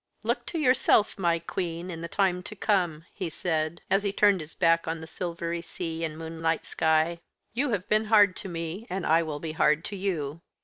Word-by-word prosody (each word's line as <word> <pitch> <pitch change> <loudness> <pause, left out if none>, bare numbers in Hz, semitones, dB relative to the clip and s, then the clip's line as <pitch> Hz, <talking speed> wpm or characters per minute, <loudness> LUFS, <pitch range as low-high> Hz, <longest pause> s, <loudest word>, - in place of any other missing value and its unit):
"Look - - -1
to 340 - -3
yourself, 255 -8 +3
my 170 -2 +2
queen, 170 +1 -4
in 165 -1 -6
the 170 - -4
time 180 0 +1
to 215 - -9
come," 175 -7 0
he 180 - -3
said, 160 0 -2
as 195 +1 +3
he 200 -1 -1
turned 200 -1 +4
his 155 0 -8
back 165 -2 +3
on 165 0 -2
the 160 - -8
silvery 170 0 -4
sea 165 -1 -5
and 155 -1 -3
moonlight 165 0 -2
sky. 160 +1 +2 0.3
"You 265 +5 0
have 200 -5 -1
been 215 +1 +2
hard 205 -3 +5
to 195 - -6
me 170 +6 -5
and 185 0 -3
I 165 +2 +4
will 155 -3 -4
be 160 +1 -4
hard 155 +1 +2
to 205 - -5
you. 165 -6 -2
170 Hz, 210 wpm, -27 LUFS, 160-195 Hz, 0.3 s, hard